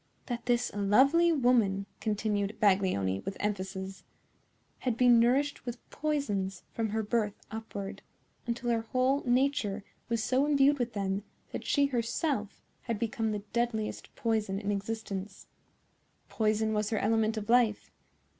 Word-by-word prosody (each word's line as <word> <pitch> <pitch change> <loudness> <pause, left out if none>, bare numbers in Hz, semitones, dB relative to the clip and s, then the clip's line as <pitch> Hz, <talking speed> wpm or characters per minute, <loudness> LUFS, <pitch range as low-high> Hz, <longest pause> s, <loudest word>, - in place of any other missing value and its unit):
"That 240 -1 -5
this 240 0 +2
lovely 265 +12 +4
woman," 240 -9 +3
continued 210 -1 -1
Baglioni, 185 - +2
with 195 - -5
emphasis, 190 -1 -3 0.8
"had 245 -3 -1
been 245 -1 +6
nourished 265 +5 +2
with 240 -1 -7
poisons 205 - -2
from 225 -1 -1
her 220 +1 -1
birth 210 -1 0 0.2
upward, 220 -3 -6 0.5
until 240 0 -1
her 230 -1 +1
whole 255 +5 +1
nature 245 -5 +1 0.3
was 230 -2 0
so 265 +3 +2
imbued 285 -1 +4
with 245 -1 -1
them 195 -1 -1 0.3
that - - -5
she 285 -1 +3
herself 240 -2 -2 0.2
had 230 -3 -3
become 225 0 -1
the 210 -1 -3
deadliest 235 -2 -2
poison 215 -4 0
in 205 0 -2
existence. 200 -1 -4 0.8
Poison 220 0 +1
was 210 0 0
her 220 - 0
element 220 +1 +1
of 210 -1 -4
life. 235 -3 +3
220 Hz, 135 wpm, -30 LUFS, 205-245 Hz, 0.8 s, been